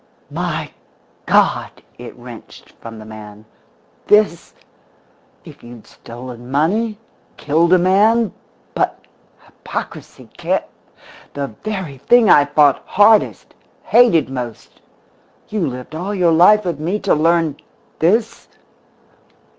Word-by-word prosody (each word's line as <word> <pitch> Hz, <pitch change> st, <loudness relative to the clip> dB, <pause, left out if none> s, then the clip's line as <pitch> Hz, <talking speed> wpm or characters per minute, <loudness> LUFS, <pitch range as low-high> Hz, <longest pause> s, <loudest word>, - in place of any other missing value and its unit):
"My -, -, -4 dB, 0.6 s
God!" -, -, +2 dB, 0.3 s
it -, -, -10 dB
wrenched -, -, -13 dB
from 115 Hz, -1 st, -9 dB
the 110 Hz, -, -11 dB
man. 105 Hz, -1 st, -12 dB, 0.6 s
"This? 210 Hz, -5 st, +2 dB, 0.9 s
If -, -, -14 dB
you'd 120 Hz, -1 st, -13 dB
stolen 120 Hz, +1 st, -11 dB
money 205 Hz, +11 st, 0 dB, 0.4 s
killed 160 Hz, +4 st, +1 dB
a 185 Hz, -, +7 dB
man 205 Hz, +4 st, +2 dB, 0.4 s
but -, -, -1 dB, 0.5 s
hypocrisy, -, -, -8 dB
cant -, -, -1 dB, 0.7 s
the 140 Hz, -1 st, -3 dB
very 190 Hz, -10 st, -5 dB
thing 235 Hz, -, +4 dB
I've 145 Hz, 0 st, +4 dB
fought 145 Hz, -3 st, +4 dB
hardest, 210 Hz, +2 st, +2 dB, 0.3 s
hated 230 Hz, -, +4 dB
most! 125 Hz, -4 st, -8 dB, 0.7 s
You 210 Hz, -5 st, -1 dB
lived 125 Hz, +2 st, -8 dB
all 185 Hz, +6 st, -4 dB
your 175 Hz, -3 st, +2 dB
life 190 Hz, +6 st, +5 dB
with 170 Hz, -5 st, -3 dB
me 175 Hz, +7 st, -2 dB
to 195 Hz, -, +1 dB
learn 165 Hz, -1 st, +1 dB, 0.4 s
_this? 220 Hz, +7 st, 0 dB
165 Hz, 110 wpm, -18 LUFS, 135-205 Hz, 0.9 s, a